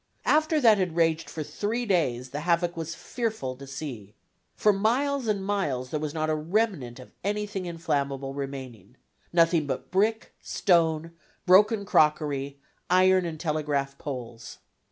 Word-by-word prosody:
After 310 +1 +3
that 225 -6 +5
had 180 -3 -1
raged 165 -2 +1
for 155 +1 -5
three 225 +9 -3
days 130 - 0
the 145 - -4
havoc 170 +2 +1
was 165 0 -5
fearful 220 - -3
to 140 +1 -10
see. 130 -7 -7 0.4
For 210 - +3
miles 250 +6 +1
and 200 -3 0
miles 145 -11 -1
there 150 - -1
was 150 -1 -3
not 155 +1 -2
a 155 - +1
remnant 155 - -1
of 130 - -13
anything 205 -2 -2
inflammable 140 -5 -2
remaining, 130 -6 -7 0.3
nothing 165 -2 +3
but 135 - -4
brick, 215 +4 +1
stone, 165 -3 +1 0.3
broken 200 +3 +5
crockery, 145 -5 +1 0.3
iron 185 0 +4
and 160 -2 -6
telegraph 150 -4 -1
poles. 120 -4 -7
165 Hz, 145 wpm, -27 LUFS, 140-200 Hz, 0.4 s, that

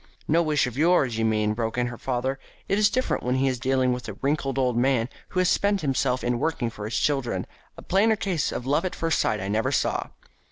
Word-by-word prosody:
"No 165 +3 +3
wish 155 -4 +2
of 125 +2 -5
yours, 150 -9 +3
you 110 - +1
mean," 105 -1 +1
broke 115 +1 -3
in 125 - +2
her 120 -1 -5
father. 130 +1 -2 0.3
"It's 205 +1 +3
different 255 +3 -1
when 125 +1 0
he 135 +1 +2
is 130 -2 -1
dealing 130 0 +1
with 125 -1 -6
a - - -5
wrinkled 135 +3 -1
old 125 -2 +1
man 125 -1 +2 0.2
who 185 - -2
has 185 - +3
spent 200 +1 +2
himself 130 -2 0
in 120 0 0
working 135 -7 -1
for 105 -2 -7
his 110 - -2
children. 125 -10 0 0.3
A - - -10
plainer 215 +4 +3
case 190 -6 -1
of 125 - -4
love 145 +6 +1
at 185 - -3
first 165 -1 0
sight 105 - +1
I 95 - -4
never 105 +2 0
saw." - - 0
130 Hz, 235 wpm, -25 LUFS, 120-160 Hz, 0.3 s, No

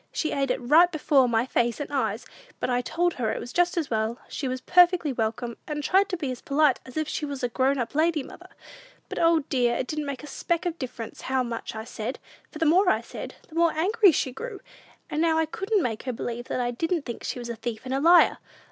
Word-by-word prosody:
She 310 - -1
ate 275 -1 0
it 250 - 0
right 315 +8 +5
before 290 -5 +3
my 230 +1 +2
face 240 -3 0
and 290 0 -5
eyes; 225 -4 -1 0.3
but - - -1
I 245 0 +2
told 345 +7 0
her 225 -3 -1
it - - -3
was 240 - -8
just 355 0 +2
as 320 -6 -1
well, 220 +1 0
she 275 - -4
was 255 0 -2
perfectly 350 -2 +4
welcome, 230 +1 -2
and 295 -1 -3
tried 385 +4 +3
to 365 - -2
be 285 -6 -3
as 250 - -7
polite 285 -2 +2
as 255 - -9
if 310 -1 0
she 310 - -3
was 280 -3 -4
a 245 - +1
grown 265 +3 +1
up 240 -3 -3
lady, 315 -1 +2
mother. - - -13 0.6
But, - - -4
O, 330 -1 +4
dear, 250 -4 +1
it 260 - -1
didn't 300 +2 -4
make 275 -2 -5
a - - -8
speck 340 +4 -2
of 345 -1 -2
difference 245 -4 -6
how 260 -1 0
much 230 -2 -5
I 220 - -5
said; 235 +1 -5 0.3
for - - -10
the 325 - 0
more 360 +5 +5
I - - +2
said, - - -8
the - - -18
more 335 0 +3
angry 390 +5 +4
she 265 -3 -1
grew, 430 - -7 0.5
and 305 +2 -1
I 320 -1 +3
couldn't 390 +4 -1
make 225 -3 -2
her 255 - -4
believe 240 +1 -5
I 245 -1 -1
didn't 325 +6 -1
think 235 -4 -7
she - - -3
was 240 -1 -6
a 235 - -3
thief 225 -1 -5
and 260 - -3
a 270 - +1
liar! 340 +4 +6
275 Hz, 245 wpm, -26 LUFS, 245-330 Hz, 0.6 s, liar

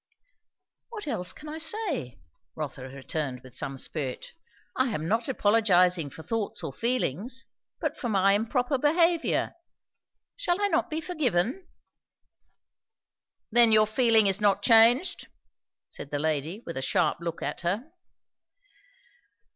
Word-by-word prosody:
"What 440 -3 -7
else 180 -10 0
can 305 - -12
I 310 +1 -6
say?" 320 - -2 0.4
Rotha - - -5
returned 135 -1 -4
with 130 -1 -15
some 135 +1 -4
spirit. 135 -2 -3 0.4
"I 260 - +2
am 160 -8 -3
not 230 +6 0
apologizing 185 - +3
for 160 - -11
thoughts 220 -2 -3
or 145 - -5
feelings, 240 - -2 0.3
but - - -2
for 240 - -4
my 195 -1 +3
improper 245 +5 0
behaviour. 335 +3 +2 0.8
Shall 400 -8 0
I 410 0 +1
not - - +1
be 315 +1 -3
forgiven?" 290 - -1 1.8
"Then 235 0 +6
your 215 0 +6
feeling 225 -1 +3
is 195 +1 +2
not 205 -2 +2
changed?" 235 +8 +5 0.6
said - - -10
the 145 - -2
lady 155 - -2
with 170 - -6
a - - -2
sharp 135 - +1
look 170 -1 -5
at - - -4
her. 205 - -2
220 Hz, 130 wpm, -27 LUFS, 170-265 Hz, 1.8 s, Then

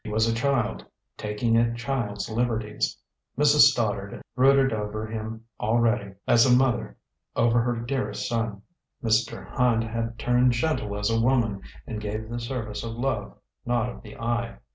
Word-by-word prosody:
He - - -7
was 110 +2 +2
a 115 - +1
child, 120 -1 0 0.3
taking 105 +2 0
a 115 0 +2
child's 115 -5 -2
liberties. 110 - -1 0.4
Mrs. - - +7
Stoddard - - -2 0.2
brooded 135 0 +4
over 105 0 -3
him 110 +1 -6
already, 115 -2 +1
as 115 - +6
a 125 0 +5
mother 130 -2 0 0.4
over 120 0 +3
her 120 +1 0
dearest 125 +3 -2
son; 115 -4 -2 0.4
Mr. 115 0 +1
Hand 120 -3 +3
had 115 0 -3
turned 125 +1 +3
gentle 120 -6 -1
as 105 +2 0
a 115 0 +2
woman 115 -5 +2 0.2
and 110 -3 -5
gave 110 +1 -4
the 120 0 -4
service 115 -4 -4
of 115 -1 -4
love, 130 +3 -3 0.3
not 120 0 0
of - - -9
the 105 -2 -12
eye. 115 0 -2
115 Hz, 160 wpm, -26 LUFS, 110-120 Hz, 0.4 s, Mrs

